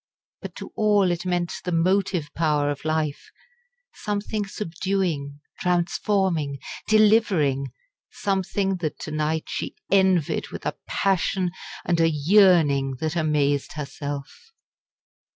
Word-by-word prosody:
But - - -8
to - - -8
all 205 -4 +3
it 175 +1 -3
meant 175 -1 0
the 180 - -3
motive 180 -1 +1
power 150 -3 +1
of 145 - -6
life 155 -2 -1 0.6
something 210 0 -3
subduing, 175 -7 -2 0.2
transforming, 175 -3 0 0.3
delivering 205 -11 +3 0.4
something 195 0 -1
that 160 -4 -3
to 155 - -5
night 155 +1 -1
she - - -4 0.2
envied 190 -5 +3
with - - -9
a - - -1
passion 190 -1 +1 0.3
and 170 -1 +1
a 165 0 +4
yearning 150 -4 +4
that 160 +1 -2
amazed 150 -3 +1
herself. 145 - -6
170 Hz, 115 wpm, -24 LUFS, 150-195 Hz, 0.6 s, a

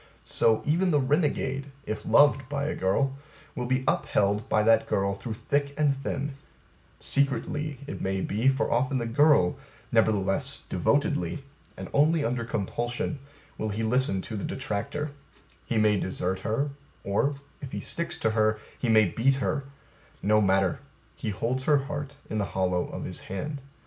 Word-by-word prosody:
So, 110 -1 +2
Even 175 +5 +2
the 150 -4 +3
renegade, 140 -1 0 0.2
if 110 - -4
loved 140 -2 +5
by 145 -1 -1
a 155 - -1
girl, 135 +9 0 0.3
will 125 -1 -3
be 130 +1 +1
upheld 105 +1 +1
by 105 - +3
that 115 0 +4
girl 100 0 +1
through 105 +3 -5
thick 140 +4 -1
and 145 -2 +3
thin 140 +1 -3 0.7
secretly, 145 +1 0
it 145 - -6
may 95 0 -1
be, 110 +7 0
for 135 0 +2
often 130 +3 +1
the 120 - -1
girl, 125 - +4 0.3
nevertheless 105 -4 +1
devotedly, 90 +9 0 0.3
and - - -6
only 155 +1 +3
under 120 0 -1
compulsion 120 +6 -2 0.4
will 110 - -1
he 105 +2 -2
listen 110 -4 +2
to 110 - -6
the 100 - -4
detractor: 135 +5 -3 0.6
he 115 - 0
may 105 -2 +4
desert 95 0 -2
her, 125 +8 -1 0.3
or, 120 +9 +1 0.3
if 135 - -7
he - - -3
sticks 170 0 -3
to 110 - +1
her, 110 -1 +2 0.2
he 125 - -1
may 110 -1 +6
beat 120 +9 +2
her; 135 +1 -1 0.6
no 105 +1 +4
matter: 95 +4 +2 0.4
he 115 - -4
holds 125 +5 -2
her 150 -1 +5
heart 145 -1 -5
in 110 - -2
the 100 - +1
hollow 90 -1 +1
of - - -6
his - - -3
hand. 145 +9 -5
120 Hz, 165 wpm, -27 LUFS, 105-140 Hz, 0.7 s, may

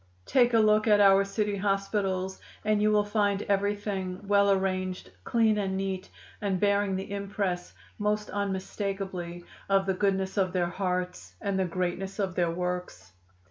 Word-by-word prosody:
Take 245 -2 +3
a - - +6
look 215 0 +4
at 210 -1 +5
our 195 -1 +6
city 205 +1 -1
hospitals, 195 -1 -1 0.2
and 215 -1 +2
you 215 0 +4
will 210 -1 +4
find 205 -1 +1
everything 200 -2 -1
well 200 0 +4
arranged, 185 -1 -1
clean 220 -2 +3
and 190 -1 -1
neat, 190 -1 -3 0.3
and 195 -3 0
bearing 200 -1 +2
the 190 +1 -5
impress 200 -3 -3 0.2
most 210 0 -1
unmistakably 190 -3 -3 0.2
of 195 -1 +3
the 190 - +1
goodness 190 0 0
of 185 -2 +1
their 175 -2 +1
hearts 180 -1 -3
and 200 -2 -1
the 190 - +2
greatness 185 +2 -3
of 195 -3 -1
their 175 -2 +1
works. 180 - -4
195 Hz, 155 wpm, -28 LUFS, 185-205 Hz, 0.3 s, a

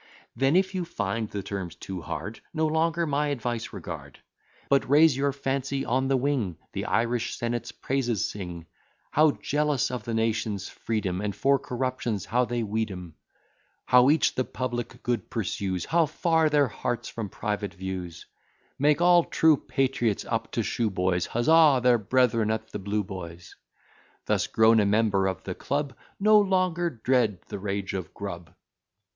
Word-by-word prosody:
Then, 135 +6 +2
if 190 +1 +2
you 185 -2 -1
find 110 - -3
the 100 -2 -5
terms 95 -4 -5
too 95 -2 -7
hard, 105 +6 -6 0.2
No 160 0 +2
longer 165 +2 +1
my 150 0 0
advice 120 -4 -3
regard: - - -8 0.5
But 140 -2 +2
raise 150 0 +6
your 140 +1 +1
fancy 135 0 -2
on 130 +2 +1
the 135 0 +2
wing; 125 - -1 0.2
The - - -3
Irish 115 +1 0
senate's 120 0 -3
praises 120 -6 -1
sing; 90 -4 -7 0.5
How 155 +1 +5
jealous 150 -4 0
of 125 -4 -4
the 115 0 -3
nation's 110 -3 -1
freedom, 100 -5 -2
And 105 -2 -3
for 140 +6 +3
corruptions 125 -6 -3
how 125 +2 +1
they 120 -1 -2
weed 110 +1 -1
'em; 90 -4 -8 0.7
How 125 +1 +6
each 155 0 +3
the 130 - 0
public 120 -2 -5
good 120 -5 -2
pursues, 95 -5 -2
How 165 -1 +2
far 160 +1 +2
their 145 -2 +3
hearts 120 +2 -3
from 110 -4 -5
private 105 0 -3
views; 95 -2 -6 0.5
Make 150 +3 +3
all 175 -1 +6
true 160 -1 +4
patriots, 130 -6 -1
up 115 0 -2
to 115 - 0
shoe 115 +1 0
boys, 90 -2 0
Huzza 150 +3 +5
their 125 -2 +5
brethren 115 0 +2
at 110 0 -3
the 105 - -4
Blue 105 +2 -1
boys; 90 -3 -9 0.7
Thus - - +1
grown 110 0 +5
a 105 - +3
member 100 -2 +2
of 95 - -3
the 95 - -4
club, 140 +4 -3 0.2
No 215 +1 +6
longer 185 -3 +1
dread 120 - 0
the - - -5
rage 100 0 -3
of 95 -4 -5
Grub. 85 -5 -7
120 Hz, 165 wpm, -27 LUFS, 100-140 Hz, 0.7 s, raise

